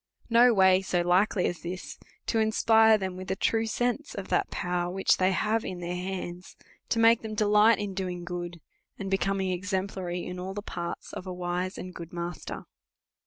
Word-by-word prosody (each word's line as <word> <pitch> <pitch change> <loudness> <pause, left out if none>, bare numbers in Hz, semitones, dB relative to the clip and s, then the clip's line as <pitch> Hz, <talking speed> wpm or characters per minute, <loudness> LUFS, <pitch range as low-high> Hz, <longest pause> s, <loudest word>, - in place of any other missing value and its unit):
No 240 +2 +7
way 190 -3 +5
so 180 -2 0
likely 180 +2 +2
as 175 - -2
this, 180 +1 -7 0.3
to 225 - +1
inspire 220 0 +5
him 190 -2 -4
with 185 0 -7
a 190 - 0
true 225 +3 +1
sense 245 +6 -1
of 195 -2 -6
that - - +1
power 175 -1 -2
which 190 +1 +2
they 185 0 +3
have 215 +4 +1
in 185 -2 -5
their 175 0 -4
hands, 180 -1 -5 0.3
to - - +1
make 230 0 +5
them 220 -1 -5
delight 210 +2 +5
in 205 -2 -4
doing 180 -2 -4
good, 175 -1 -5 0.4
and 195 -1 -5
becoming 195 -1 0
exemplary 185 -1 -3
in 180 0 -6
all 190 +1 -5
the 205 - -5
parts 170 -4 -6
of 185 - -7
a - - -4
wise 180 +1 -3
and 185 0 -7
good 170 -1 -9
master. 175 -1 -5
190 Hz, 190 wpm, -28 LUFS, 180-210 Hz, 0.4 s, No